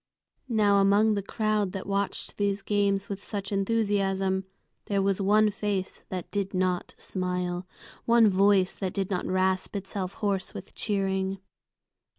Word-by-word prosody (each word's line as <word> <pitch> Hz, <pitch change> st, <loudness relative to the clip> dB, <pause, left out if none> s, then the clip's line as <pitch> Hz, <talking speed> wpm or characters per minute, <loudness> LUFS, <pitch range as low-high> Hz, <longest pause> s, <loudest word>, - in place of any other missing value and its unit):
Now 210 Hz, -3 st, +4 dB
among 200 Hz, +2 st, +4 dB
the 200 Hz, -, 0 dB
crowd 210 Hz, -1 st, 0 dB
that 195 Hz, -, -5 dB
watched 200 Hz, 0 st, -2 dB
these 200 Hz, -1 st, 0 dB
games 200 Hz, -1 st, +1 dB
with 200 Hz, -1 st, -6 dB
such 200 Hz, -2 st, -4 dB
enthusiasm, 195 Hz, -2 st, +1 dB, 0.4 s
there 200 Hz, -1 st, 0 dB
was 195 Hz, 0 st, +1 dB
one 210 Hz, +2 st, +4 dB
face 200 Hz, -2 st, -3 dB
that 185 Hz, -2 st, -5 dB
did 200 Hz, -1 st, -2 dB
not 185 Hz, -1 st, -1 dB
smile, 180 Hz, -1 st, -3 dB, 0.4 s
one 230 Hz, -1 st, +6 dB
voice 195 Hz, -1 st, +4 dB
that 190 Hz, -2 st, -4 dB
did 195 Hz, -1 st, -1 dB
not 180 Hz, -, -1 dB
rasp 185 Hz, +1 st, 0 dB
itself 195 Hz, -1 st, -3 dB
hoarse 195 Hz, -3 st, -2 dB
with -, -, -8 dB
cheering. 195 Hz, -2 st, 0 dB
195 Hz, 145 wpm, -27 LUFS, 190-205 Hz, 0.4 s, one